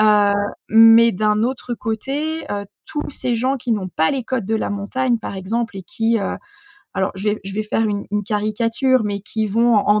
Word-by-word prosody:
heu, 210 -1 +5 0.4
mais 225 +1 +7
d'un 210 +2 +1
autre 245 0 -2
côté, 285 +9 -3
heu, 200 0 -3 0.2
tous 300 -1 -4
ces 250 -3 -2
gens 255 +4 0
qui 245 -2 -2
n'ont 195 -4 -2
pas 160 -2 +1
les 265 -4 -2
codes 245 -6 -2
de 225 - 0
la - - -2
montagne 235 +5 -1
par 200 - -6
exemple 225 +3 -3
et 190 - -6
qui, 230 +1 0
heu 200 - -2 0.6
alors 190 0 +1
je 200 +3 -2
vais 210 - -3
je 195 - -6
vais 215 - -1
faire 215 - -1
une 205 -2 -1
une 210 - +1
caricature 225 +5 +1
mais 205 -1 -2
qui 215 +2 -2
vont 230 +3 +3
en 210 0 +3
220 Hz, 210 wpm, -20 LUFS, 205-240 Hz, 0.6 s, mais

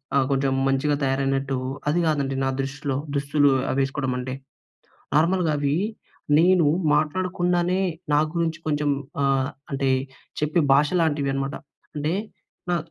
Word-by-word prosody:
ఆహ్, 135 -1 +4
కొంచెం 135 0 +1
మంచిగా 140 +2 +1
తయారైనట్టు, 135 0 0 0.3
అది 170 +4 +2
కాదండి 140 -3 0
నా - - +1
దృష్టిలో. 135 0 -3 0.2
దుస్తులు 140 0 +3 0.2
ఆహ్, - - 0
వేసుకోవడం 135 -1 -1
అంటే, 130 +1 -4 0.8
నార్మల్‍గా 165 +1 +3
అవి 145 +1 +1 0.6
నేను 175 -2 +5 0.3
మాట్లాడకుండానే, 175 +3 +1 0.3
నా 145 - +5
గురించి 165 -1 -1
కొంచెం 150 -1 +1 0.3
ఆహ్, 135 0 +1 0.2
అంటే 135 -1 +1 0.5
చెప్పే 155 +3 +2
భాష 145 +1 +4
లాంటివి 145 -4 +1
అనమాట. 135 +1 -2 0.4
అంటే 150 +3 -1 0.6
నా 175 - +2
145 Hz, 125 wpm, -24 LUFS, 135-160 Hz, 0.8 s, నేను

